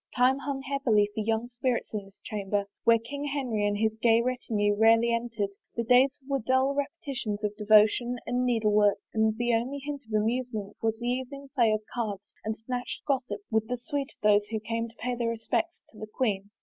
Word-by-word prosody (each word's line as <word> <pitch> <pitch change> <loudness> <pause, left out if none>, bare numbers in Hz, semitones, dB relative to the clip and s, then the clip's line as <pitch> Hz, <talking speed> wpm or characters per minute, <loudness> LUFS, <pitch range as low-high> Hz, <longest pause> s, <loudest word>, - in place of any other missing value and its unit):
Time 255 +2 +4
hung 275 -1 -4
heavily 260 -7 +2
for - - -4
young 225 +2 0
spirits 245 -1 -2
in 205 -2 -3
this 195 0 -20
chamber 205 -1 -2 0.2
where 230 0 +7
King 280 +6 -6
Henry 255 -8 -1
and 205 0 0
his 220 +1 +1
gay 230 -1 +5
retinue 230 -4 0
rarely 225 +2 +5
entered; 230 -4 -2 0.2
the 235 - 0
days 260 +4 +4
were 275 -1 0
dull 260 +3 +2
repetitions 275 -7 -3
of 210 0 -1
devotion 215 +3 +4
and 245 +1 0
needle 225 -4 +2
work 205 -1 +4 0.2
and 220 0 +2
the 240 0 +1
only 245 +5 0
hint 285 0 -5
of - - -15
amusement 220 -2 -2
was 225 0 0
the 240 - -5
evening 260 +3 -3
play 235 -6 +4
of 215 0 0
cards 210 -5 -4
and 220 0 -2
a - - -23
snatched 245 +2 -5
gossip 250 -7 -1
with 220 0 +1
the 250 - -2
suite 275 +2 -3
of - - -30
those 205 0 +4
who 220 0 -2
came 230 +1 -3
to 230 - -21
pay 250 +2 -3
their 235 -1 -1
respects 230 +9 -2
to 215 - -16
the 215 - -6
queen. 205 -4 -1
230 Hz, 210 wpm, -28 LUFS, 215-255 Hz, 0.2 s, where